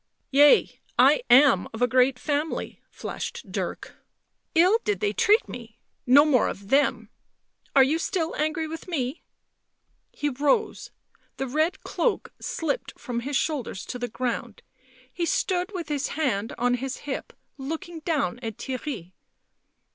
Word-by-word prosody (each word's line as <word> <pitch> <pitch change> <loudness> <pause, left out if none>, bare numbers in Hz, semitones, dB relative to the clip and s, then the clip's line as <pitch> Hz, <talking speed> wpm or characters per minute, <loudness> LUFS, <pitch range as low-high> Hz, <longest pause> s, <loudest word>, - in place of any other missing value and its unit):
" - - -49
Yea, 285 +2 +5 0.2
I - - +6
am 255 -6 +6
of 220 - -7
a - - +5
great 255 +1 +3
family," 300 +3 -3
flashed - - -6
Dirk. - - -5 0.6
"Ill 365 +7 +5
did 415 - 0
they 420 -1 0
treat 430 +3 +3
me. 235 -2 -10 0.3
No 280 +4 +7
more 265 -6 +3
of 200 0 -7
them... 280 +2 +2 0.7
are 270 - +8
you 300 +5 +1
still 335 -2 -2
angry 310 +1 -1
with 325 +2 -8
me?" 280 -4 -2 0.9
He 295 - -3
rose; 290 - 0 0.5
the 270 - -2
red 310 +7 0
cloak 485 - -1
slipped - - -3
from 240 -1 -3
his 270 +3 -1
shoulders 270 -11 -2
to 250 - -6
the 245 - -2
ground; 240 -1 -4 0.5
he 340 -1 -2
stood 365 +2 0
with 360 -5 -5
his 290 -2 -1
hand 230 -8 -1
on 245 +1 +2
his 260 +2 -3
hip, 280 - -4 0.3
looking 325 +5 -5
down 295 - -1
at 225 -4 -6
Theirry. 255 - -5
285 Hz, 145 wpm, -25 LUFS, 245-325 Hz, 0.9 s, are